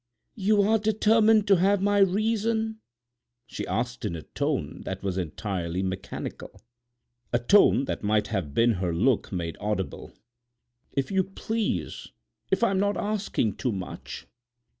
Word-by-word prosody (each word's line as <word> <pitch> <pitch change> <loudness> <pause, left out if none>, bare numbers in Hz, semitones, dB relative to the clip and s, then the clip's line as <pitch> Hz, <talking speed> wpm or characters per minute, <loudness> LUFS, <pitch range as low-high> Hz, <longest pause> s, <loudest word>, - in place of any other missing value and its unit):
"You 205 0 +2
are 220 +2 +3
determined 220 0 +4
to 195 -1 +6
have 195 +3 +3
my 205 +1 +2
reason?" 220 +3 +1 0.7
she - - -6
asked 120 +5 -2
in 105 -6 -2
a 80 - -7
tone - - -3
that - - -5
was 95 -2 -1
entirely 90 0 -3
mechanical—a 120 +5 -7
tone 140 - +5
that - - -3
might 105 0 +1
have 90 -10 -3
been 120 +1 +4
her 85 -3 -1
look 120 +7 +1
made 85 -3 -3
audible. 105 -2 -3 0.8
"If 135 +2 -1
you 190 -1 +3
please—if 220 +4 -4
I'm 195 -4 +2
not 205 +1 +1
asking 205 - -1
too 125 - -1
much." 95 -2 -7
125 Hz, 135 wpm, -26 LUFS, -, 0.8 s, to